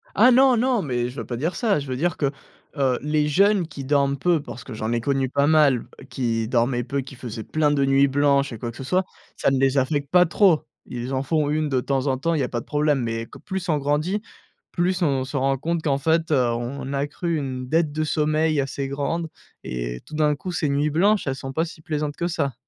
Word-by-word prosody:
Ah 255 - +6
non, 260 -1 +5
non! 245 -2 +2
Mais 125 -4 -1
je 125 - -11
veux 115 - -4
pas 120 +2 -4
dire 165 +7 -2
ça, 205 -3 +1
je 140 - -7
veux 130 -1 -3
dire 175 +4 0
que, 140 -2 0 0.5
heu, 130 -3 +2
les 150 +1 +1
jeunes 195 +2 +3
qui 140 - -8
dorment 140 0 +1
peu, 170 +1 +2
parce 125 -3 -9
que 130 - -9
j'en 110 +1 -3
ai 120 0 0
connu 135 0 0
pas 140 +2 +2
mal, 145 -6 +4 0.2
qui 115 -2 -1
dormaient 120 +1 +1
peu, 140 +3 -2
qui 135 +1 -11
faisaient 120 -3 -7
plein 150 +2 +1
de 140 -2 +2
nuits 135 +1 +4
blanches 140 -1 +2
et - - -6
quoi 120 +2 -5
que 120 - -14
ce - - -6
soit, 180 +8 +1 0.3
ça - - +1
ne 135 - +1
les 135 +1 +2
affecte 140 +1 0
pas 180 +2 +5
trop. 175 -1 +3 0.2
Ils 125 +2 -5
en 130 - 0
font 150 0 0
une 155 0 0
de 130 -2 +1
temps 135 +1 -1
en 130 -1 +1
temps, 165 +5 0
il 155 - 0
y 130 - 0
pas 120 -1 -3
de - - -15
problème, 150 -2 +1
mais 115 0 -3
que - - -13
plus 190 -1 -5
on 155 - +3
grandit, 150 +8 0 0.5
plus 185 +1 0
on 135 -5 +1
se 135 - -8
rend 135 0 +1
compte 165 +4 -2
qu'en 140 -3 +1
fait, 160 +3 +1
heu, 145 - +4 0.2
on 130 +3 -4
accru 145 +4 -2
une 130 -3 -4
dette 160 +2 +1
de 155 +1 -1
sommeil 155 0 +1
assez 135 0 -3
grande 145 +5 -2 0.4
et - - -4
tout 155 - -9
d'un 150 -1 +2
coup, 180 +5 -6
ces 155 -4 -1
nuits 145 +2 +1
blanches, 195 +4 +2
elles 135 - 0
sont 135 0 -7
pas 160 +4 +1
si 160 -2 -11
plaisantes 150 -2 -3
que 170 - -2
ça. 150 -6 -1
145 Hz, 250 wpm, -23 LUFS, 130-160 Hz, 0.5 s, Ah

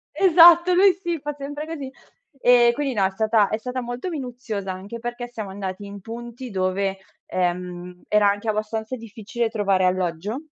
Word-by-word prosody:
Esatto, 345 -1 +7
lui 380 +1 +6
sì, 345 -2 -4
fa 295 +1 -4
sempre 290 +2 -6
così. 290 -5 -6 0.5
Ehm, 240 -1 +6
quindi 275 -1 -2
no, 200 -3 +1
è 190 - +2
stata 215 +1 +2
è 215 - -1
stata 250 +2 -4
molto 245 +8 -5
minuziosa, 245 - -5
anche 200 +5 -7
perché 240 +1 -5
siamo 215 -4 -6
andati 190 0 -6
in 200 -1 -9
punti 235 +2 -8
dove, 190 +1 -1 0.3
ehm, 180 0 -3
era 210 -1 +4
anche 205 +2 -2
abbastanza 220 +3 -2
difficile 225 0 -4
trovare 195 -4 +1
alloggio. 185 - -1
225 Hz, 165 wpm, -23 LUFS, 195-260 Hz, 0.5 s, Esatto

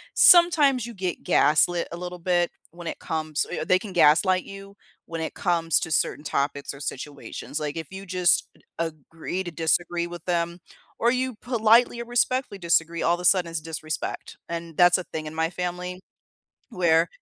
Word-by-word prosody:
sometimes 295 -9 +6
you 235 - -9
get 185 -3 -4
gaslit 170 +3 +3
a 170 - -6
little 180 0 -6
bit 175 0 +1 0.2
when 170 0 -10
it - - -4
comes 155 -1 -2 0.2
they 185 0 +4
can 195 -3 -9
gaslight 180 +3 +4
you 195 0 -11 0.3
when 165 -1 -5
it 160 - -4
comes 165 -3 +1
to 160 - -4
certain 150 -1 +1
topics 140 -1 -2
or 140 - -12
situations. 145 +2 -6
Like, 150 +1 -4
if 160 -2 -5
you 190 +1 -8
just 180 -1 +2 0.3
agree 165 +3 -4
to 175 - -6
disagree 170 +1 0
with 175 -1 -10
them 170 -1 -1 0.4
or 235 - +4
you 255 0 -1
politely 235 0 +3
or - - -6
respectfully 245 -2 0
disagree, 170 -1 +1
all 170 - +3
of - - -10
a - - -4
sudden 180 -2 +4
it's 165 -2 -4
disrespect, 155 -1 -5
and 170 -1 -6
that's 175 0 +6
a 185 - -4
thing 155 -1 -6
in 155 - -7
my 160 0 0
family 180 +1 -5 0.7
where 170 -4 +3
175 Hz, 180 wpm, -25 LUFS, 160-190 Hz, 0.7 s, sometimes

